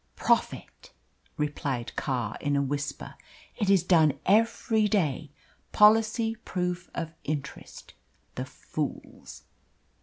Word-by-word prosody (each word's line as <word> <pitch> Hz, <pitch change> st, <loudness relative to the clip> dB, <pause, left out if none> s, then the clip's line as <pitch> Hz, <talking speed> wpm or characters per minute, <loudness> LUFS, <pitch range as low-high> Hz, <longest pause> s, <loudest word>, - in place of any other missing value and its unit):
"Profit," -, -, -1 dB, 0.5 s
replied 140 Hz, -5 st, -3 dB
Carr, 125 Hz, -6 st, -2 dB
in 145 Hz, 0 st, 0 dB
a 140 Hz, -, +2 dB
whisper. 145 Hz, +1 st, -4 dB, 0.4 s
"It 205 Hz, -4 st, -1 dB
is 195 Hz, -4 st, +5 dB
done 160 Hz, -6 st, +4 dB
every 220 Hz, +1 st, +3 dB
day 160 Hz, -8 st, 0 dB, 0.4 s
policy 220 Hz, +1 st, +4 dB
proof 180 Hz, -1 st, -3 dB
of 165 Hz, -1 st, -4 dB
interest 145 Hz, -1 st, -6 dB, 0.4 s
the -, -, -4 dB
fools!" -, -, -6 dB
165 Hz, 100 wpm, -27 LUFS, 145-210 Hz, 0.5 s, is